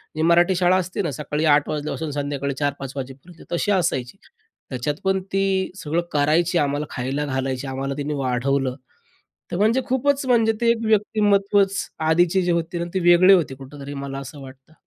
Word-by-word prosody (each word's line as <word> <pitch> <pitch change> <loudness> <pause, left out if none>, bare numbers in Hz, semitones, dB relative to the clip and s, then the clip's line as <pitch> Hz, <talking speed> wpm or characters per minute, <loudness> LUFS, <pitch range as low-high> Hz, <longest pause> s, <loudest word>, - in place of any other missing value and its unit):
जी 155 - -2
मराठी 175 +3 +4
शाळा 180 +1 +3
असते 185 +2 -2
ना, 170 -6 -2
सकाळी 150 +3 -3
8 145 -1 +4
वाजल्यापासून 155 +1 -3
संध्याकाळी 140 -1 -3
4-5 140 -2 -3
वाजेपर्यंत 135 +6 -9
तशी 175 +4 0
असायची. 165 -6 0 0.5
त्याच्यात 130 +3 -2
पण 190 0 +1
ती 195 -1 +1
सगळं 165 -2 -2
करायची, 160 +4 +2
आम्हाला 145 -1 0
खायला 135 +3 -3
घालायची. 130 -1 -3
आम्हाला 135 +1 -3
तिने 145 +1 -3
वाढवलं. 135 0 0 0.8
तर - - -2
म्हणजे 220 +6 +3
खूपच 275 +2 +1
म्हणजे, 230 -3 +3
ते 235 0 +4
एक 230 -1 -2
व्यक्तिमत्त्वच 205 -2 +2 0.3
आधीचे 175 +3 +3
जे 175 -1 0
होते 170 0 -1
ना, 170 - -2
ते 190 - 0
वेगळे 180 +3 +7
होते. 165 -8 +2
कुठेतरी 140 +1 -9
मला 135 0 -5
असं 140 +1 -9
वाटतं. 135 +3 -14
160 Hz, 170 wpm, -22 LUFS, 140-190 Hz, 0.8 s, वेगळे